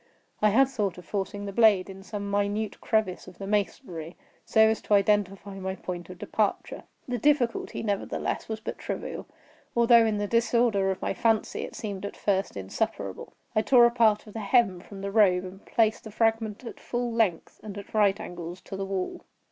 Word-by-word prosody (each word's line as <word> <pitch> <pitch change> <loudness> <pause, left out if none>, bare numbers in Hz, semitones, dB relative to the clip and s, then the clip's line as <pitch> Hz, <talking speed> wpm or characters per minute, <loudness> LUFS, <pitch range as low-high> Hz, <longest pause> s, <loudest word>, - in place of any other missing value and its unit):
I 210 - +5
had 260 +6 +5
thought 210 -9 -2
of 180 - -11
forcing 200 +2 -3
the 200 - -5
blade 210 -4 +5
in 195 0 -10
some 200 0 -5
minute 205 +1 -1
crevice 215 -5 0
of 175 - -12
the 195 - -6
masonry, 190 - -2 0.3
so 220 - +3
as 220 0 +4
to 210 - +2
identify 200 -1 +1
my 190 0 -3
point 175 -2 -6
of 185 - -9
departure. 210 +3 -2 0.2
The 245 -1 -2
difficulty, 255 -4 +1
nevertheless, 205 0 -2
was 220 -1 -3
but - - -6
trivial; - - -5 0.5
although, 235 0 +6
in 215 -1 0
the 205 - -1
disorder 230 -3 +2
of 190 - -3
my - - 0
fancy, 225 +2 +1
it - - -7
seemed 200 -3 -5
at 200 - -6
first 195 - 0
insuperable. 95 0 -4 0.2
I 215 - +4
tore 240 +1 +6
a 235 - +4
part 225 -3 +3
of 210 - -13
the 225 - -4
hem 210 -3 +3
from 195 +2 -11
the 200 0 -3
robe 195 -4 +4
and 190 +2 -10
placed 220 -2 +2
the - - -6
fragment 225 0 0
at 235 - -8
full 240 0 -2
length, 220 -7 0
and 210 -2 -8
at 200 - -9
right 205 -2 +3
angles 175 0 -7
to - - -8
the 195 0 -3
wall. 190 -1 -3
205 Hz, 195 wpm, -27 LUFS, 195-225 Hz, 0.5 s, although